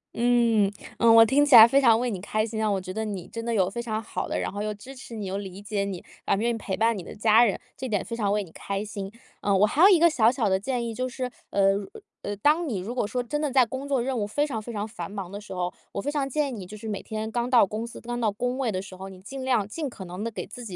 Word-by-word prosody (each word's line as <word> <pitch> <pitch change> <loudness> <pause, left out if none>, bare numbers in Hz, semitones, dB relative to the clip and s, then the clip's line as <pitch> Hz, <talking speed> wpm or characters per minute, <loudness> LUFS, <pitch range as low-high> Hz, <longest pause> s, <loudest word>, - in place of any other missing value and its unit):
嗯， 235 -4 +3 0.3
嗯， 230 -1 +6
我 225 0 +9
听 280 +6 +3
起 285 -3 +6
来 225 -1 +12
非 270 +4 +4
常 235 -5 +5
为 245 +2 -1
你 195 - -4
开 215 +3 -1
心 220 -1 -4
啊， 215 - +1
我 195 -2 0
觉 185 0 -7
得 220 +2 -2
你 195 -5 -5
真 230 - -6
的 235 - -1
有 190 -4 +2
非 235 +4 -4
常 220 -2 -3
好 - - -4
的， - - -2
然 - - -2
后 205 - -5
又 210 0 -2
支 230 +6 -11
持 250 -3 -10
你、 210 -2 -5
又 190 +1 -3
理 195 -1 -7
解 205 -1 -2
你， 190 -3 -5 0.2
啊， - - +2
愿 225 +4 0
意 - - +1
陪 195 -3 -3
伴 225 +1 +2
你 - - -5
的 - - -10
家 220 +2 +5
人， 205 - 0 0.2
这 260 - -4
点 205 -5 -1
非 230 - -8
常 210 -4 0
为 210 0 0
你 175 - -14
开 200 +4 -4
心。 200 -2 -6 0.3
呃， 200 -1 +2
我 205 - +6
还 275 +9 0
有 375 - +10
一 380 - +7
个 340 +1 +6
小 230 -8 +4
小 240 -5 0
的 190 0 +2
建 240 +3 -2
议， 230 - -4
就 255 +3 -2
是， 255 0 -4 0.2
呃， 195 0 +4 0.5
呃， 205 - -3
当 300 - +2
你 220 -9 -2
如 205 +6 -5
果 245 -4 -1
说 245 +3 -2
真 295 +5 -3
的 300 -1 0
在 260 -1 +5
工 265 +4 -6
作 270 -4 +1
任 265 +1 -2
务 205 - -1
非 290 +8 0
常 235 -7 -4
非 235 - -8
常 205 -1 -2
繁 225 - -7
忙 195 -3 -6
的 200 - -6
时 205 - -9
候， 180 0 -2 0.2
我 200 - -2
非 290 - -2
常 290 -2 -1
建 290 +1 0
议 - - -6
你 210 -7 -6
就 210 - -9
是 220 - -8
每 205 -2 -3
天 220 0 -5
刚 240 +1 -1
到 245 -4 +6
公 215 +4 -4
司、 235 - -10
刚 240 0 -4
到 225 -2 +2
工 245 +5 -2
位 260 -4 0
的 185 -2 -2
时 195 -1 -10
候， 190 +1 -7
你 190 -1 -12
尽 265 +7 -7
量 245 -6 +2
尽 295 +6 -4
可 220 -5 -9
能 180 +3 -6
地 230 - -1
给 225 - -6
自 245 - -10
己 190 -5 -7
220 Hz, 340 characters per minute, -26 LUFS, 200-245 Hz, 0.5 s, 来